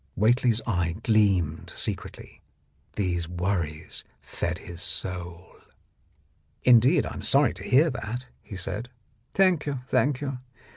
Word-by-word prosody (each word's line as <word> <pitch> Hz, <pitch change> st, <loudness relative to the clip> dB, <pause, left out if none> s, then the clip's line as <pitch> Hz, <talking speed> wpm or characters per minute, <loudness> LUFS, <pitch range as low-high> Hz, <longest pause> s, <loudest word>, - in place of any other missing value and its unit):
Whately's 115 Hz, +1 st, +3 dB
eye 85 Hz, -6 st, 0 dB
gleamed 95 Hz, -8 st, +2 dB
secretly; -, -, -5 dB, 0.5 s
these 90 Hz, -4 st, -1 dB
worries 85 Hz, -3 st, -3 dB, 0.2 s
fed 85 Hz, 0 st, -3 dB
his 85 Hz, 0 st, -8 dB
soul. 90 Hz, -2 st, -4 dB, 1.1 s
"Indeed, 125 Hz, +1 st, +6 dB
I -, -, -5 dB
am -, -, -6 dB
sorry 135 Hz, -2 st, +3 dB
to 95 Hz, +2 st, -9 dB
hear 145 Hz, +9 st, +4 dB
that," 125 Hz, 0 st, -5 dB, 0.2 s
he 100 Hz, -, -9 dB
said. 105 Hz, +6 st, -3 dB, 0.5 s
"Thank 185 Hz, -6 st, +3 dB
you, 140 Hz, -3 st, -2 dB
thank 140 Hz, -2 st, +2 dB
you. 135 Hz, -3 st, -4 dB
105 Hz, 125 wpm, -26 LUFS, 90-125 Hz, 1.1 s, Indeed